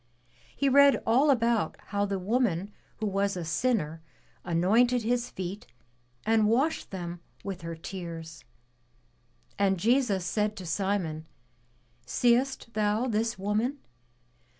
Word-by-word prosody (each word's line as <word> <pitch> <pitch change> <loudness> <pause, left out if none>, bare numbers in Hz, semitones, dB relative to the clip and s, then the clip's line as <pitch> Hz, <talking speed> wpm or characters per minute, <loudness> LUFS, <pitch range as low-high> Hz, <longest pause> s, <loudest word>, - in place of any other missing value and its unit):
He 280 - +1
read 280 +1 +6
all 260 +7 +4
about 235 -4 +2
how 205 0 0
the 195 -1 -1
woman 200 -2 0 0.3
who 220 - -3
was 200 -1 0
a 175 - -4
sinner 165 -3 0 0.4
anointed 220 +9 +3
his 240 +2 0
feet 190 +2 -6 0.6
and 220 -1 +3
washed 265 +9 +1
them 175 -2 -6 0.2
with 195 -2 -5
her 165 0 -5
tears. 165 -2 -7 1.2
And 195 -1 +3
Jesus 225 -4 +2
said 210 +4 0
to 185 - -8
Simon, 165 -3 -2 0.8
Seest 245 - +1
thou 215 +2 +1
this 225 0 0
woman? 215 +8 -1
205 Hz, 120 wpm, -28 LUFS, 180-235 Hz, 1.2 s, read